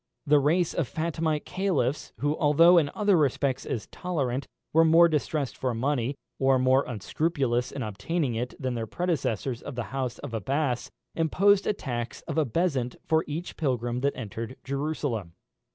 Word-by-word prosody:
The 150 0 +5
race 160 +5 +2
of 160 - -1
Fatemite 160 -1 -1
caliphs, 175 -8 -1
who, 145 +2 +1
although 165 +4 +6
in 145 -3 0
other 205 -2 +3
respects 140 -3 +1
as 115 - -3
tolerant, 140 -7 -3 0.3
were 165 +1 +6
more 165 +1 +7
distressed 150 -3 -1
for 125 -3 -2
money, 135 +1 0 0.2
or 135 0 +4
more 130 +2 +4
unscrupulous 125 - -1
in 135 - -4
obtaining 120 - -2
it, 120 +2 -3
than 130 -2 -2
their 115 -2 -3
predecessors 135 - -1
of 140 - -7
the 120 - -2
house 130 -3 -2
of 140 -5 -8
Abbas, 125 +3 -1 0.2
imposed 195 +5 +3
a - - +3
tax 120 - -5
of - - -2
a 155 - +3
bezant 130 -3 0
for 160 0 +2
each 160 +4 -5
pilgrim 125 -5 -1
that 140 +2 0
entered 115 +1 -6
Jerusalem. 135 - -3
140 Hz, 165 wpm, -27 LUFS, 125-160 Hz, 0.3 s, more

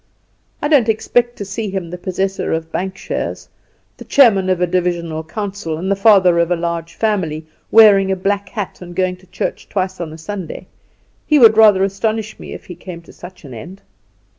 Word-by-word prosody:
"I - - +2
don't 275 -7 +3
expect 240 +2 +1
to 200 - -6
see 200 +2 -4
him 190 -3 -4
the - - -4
possessor 190 +2 -2
of 160 0 -4
bank 190 0 -3
shares, - - -4 0.5
the - - -10
chairman 200 -9 +4
of 185 -1 +1
a 180 - +3
divisional 170 -3 -2
council, 195 -2 -5
and 185 +4 -3
the - - +3
father 195 -4 +5
of 170 0 +2
a 175 - +2
large 170 0 -4
family; 170 -8 -1 0.2
wearing 200 -3 +6
a - - +1
black 195 +1 -2
hat, 205 -3 -6
and 175 -1 -10
going 185 0 0
to 185 +1 -22
church - - -5
twice 185 -2 -2
on 165 -2 -5
a 160 - -9
Sunday. 185 +2 -7 0.6
He 300 - +4
would 225 -5 +7
rather 210 -3 +6
astonish 215 +2 -2
me - - -9
if - - -9
he 180 - -8
came 175 -1 -10
to - - -16
such 180 -2 -12
an 130 - -10
end." 175 - -10
190 Hz, 200 wpm, -18 LUFS, 170-205 Hz, 0.6 s, would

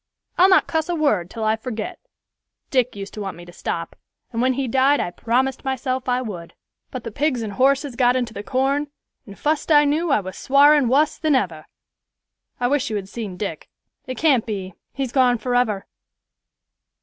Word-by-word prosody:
I'll 370 +2 +6
not 375 - +5
cuss 320 0 -1
a 350 - 0
word 215 - +1
till 225 +1 -6
I 215 0 +2
forget. 250 +10 -6 0.7
Dick 255 -3 +1
used 200 0 -7
to 210 - -6
want 195 -3 -5
me 175 - -11
to 175 - -13
stop, 170 -1 -4 0.4
and 230 - -1
when 260 +1 +3
he 270 0 -2
died 270 +4 +3
I 175 - -2
promised 255 +6 0
myself 260 -1 -2
I 250 +1 +1
would; 175 -7 -8 0.3
but 255 -3 -6
the 230 - -6
pigs 255 -1 0
and 210 -2 -5
horses 275 +3 +2
got 245 0 +3
into 245 -3 -1
the 200 - -5
corn, 270 +5 0 0.4
and 200 - -11
fust 305 +2 -1
I 295 -1 +7
knew 310 +4 +1
I 280 - +4
was 185 -2 -7
swarin' 285 0 +5
wus 285 +5 +2
than 310 -3 +2
ever. 170 -11 -2 0.9
I 245 - +1
wish 280 0 0
you 215 - -3
had 195 -2 -4
seen 210 -5 -6
Dick; 180 -6 -5 0.4
it 255 - -5
can't 275 -8 +3
be; 195 -4 -4 0.2
he's 270 -3 -3
gone 250 -2 +3
forever." 245 -5 0
250 Hz, 195 wpm, -22 LUFS, 215-280 Hz, 0.9 s, I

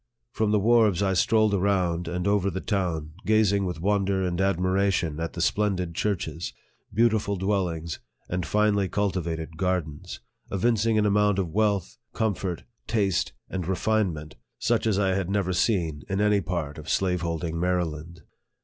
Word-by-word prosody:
From 110 0 0
the 105 - +3
wharves 110 -3 +4
I 95 -1 +2
strolled 110 +3 +3
around 90 -3 +1
and 90 +1 -2
over 100 -1 +2
the 95 0 -3
town, 85 -7 -2
gazing 105 -2 +3
with 90 -3 -4
won 100 +3 +1
der 95 -1 0
and 90 0 -1
admiration 95 -3 +1
at 85 0 -3
the 85 - -4
splendid 95 -5 0
churches, 85 -4 -2 0.4
beautiful 110 -1 +2
dwellings, 90 -4 -1 0.3
and 90 0 -2
finely 105 -1 +2
cultivated 85 -5 -2
gardens; 90 -2 -2 0.3
evincing 110 +2 +2
an 105 - +3
amount 105 -1 +3
of 95 -4 -1
wealth, 100 -2 0
comfort, 95 -5 -2 0.2
taste, 100 -5 0
and 90 -3 -4
refinement, 95 - -1 0.2
such - - +1
as 105 -3 +2
I 100 -1 +2
had 95 -1 -1
never 100 -2 0
seen 85 -6 +1
in 95 0 -1
any 105 -1 +3
part 80 -4 -3
of 75 - -9
slaveholding 85 -3 -1
Maryland. 85 -2 -2
95 Hz, 150 wpm, -26 LUFS, 85-105 Hz, 0.4 s, wharves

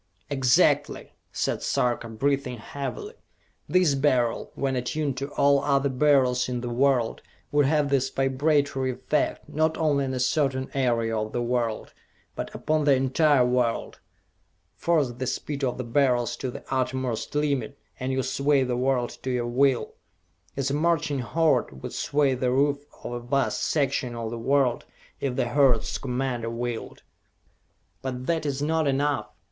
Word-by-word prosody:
"Exactly!" 130 -3 +2 0.2
said - - -1
Sarka, 120 -1 0
breathing 135 +2 -1
heavily. 140 - -6 0.6
"This 180 -5 +4
Beryl, 130 -4 +1
when 135 -1 -1
attuned 135 +3 -2
to 140 +1 -3
all 140 0 +3
other 140 -1 +2
Beryls 130 -2 +3
in 125 -1 -2
the 120 -1 -4
world, 125 -2 +1 0.3
would 145 -2 +3
have 150 -1 +2
this 135 -1 +1
vibratory 135 0 +1
effect, - - -1
not 160 +1 0
only 145 -3 +1
on 130 0 -3
a - - -2
certain 130 0 0
area 115 -4 +1
of 110 0 -3
the 120 - -1
world 120 -2 -2 0.4
but - - -4
upon 155 0 0
the 140 -2 +5
entire 135 +1 +3
world! 125 -2 0 0.8
Force 155 -7 +1
the 125 +2 -5
speed 140 +2 -3
of 125 -2 0
the 125 - -3
Beryls 120 -1 +1
to 130 - -3
the - - -8
uttermost 130 -1 -2
limit, 140 -4 -1 0.2
and 130 0 -2
you 130 0 0
sway 140 0 +2
the 125 -1 -1
world 125 -1 0
to 130 - -4
your 125 -2 0
will! 130 +1 +1 0.6
As 140 0 0
a - - -1
marching 155 -2 +1
horde 125 - 0
would - - -5
sway 140 -2 +1
the 125 0 0
roof 140 +2 +1 0.2
of - - -5
a 120 - -3
vast 135 +3 0
section 135 -4 0
of 115 -1 -4
the 120 - -5
world 135 0 +1 0.4
if 135 -3 -2
the 120 - 0
horde's 130 -3 +2
commander 125 -2 -2
willed! 120 0 -5 1.0
"But 130 -1 -4
that 160 -1 0
is 140 0 -2
not 160 0 +1
enough! 140 +1 0
135 Hz, 160 wpm, -26 LUFS, 125-145 Hz, 1.0 s, the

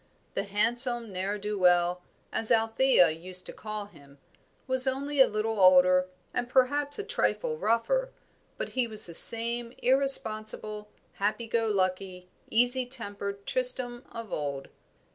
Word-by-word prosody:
The 195 - -3
handsome 235 +3 +2
ne'er 195 +3 -3
do 210 0 -5
well, 180 0 +3 0.3
as 225 - +2
Althea 225 -5 +3
used 180 +3 -3
to - - -9
call 215 -1 -6
him, 140 -8 -19 0.5
was 260 0 +1
only 280 +2 0
a - - +7
little 215 0 -3
older, 185 0 +5 0.3
and 245 0 -3
perhaps 285 +3 +2
a 415 - -4
trifle 470 +2 -2
rougher, - - 0 0.5
but - - -4
he 255 -2 -1
was 215 -2 0
the 170 - -5
same 235 +4 +3
irresponsible, 215 -5 0 0.2
happy 210 +4 -2
go 225 0 -1
lucky, 185 -2 -2 0.2
easy 245 +2 +1
tempered 200 -5 -4
Tristram 250 -1 -2
of 230 -3 -8
old. 140 -2 -4
220 Hz, 140 wpm, -28 LUFS, 190-250 Hz, 0.5 s, a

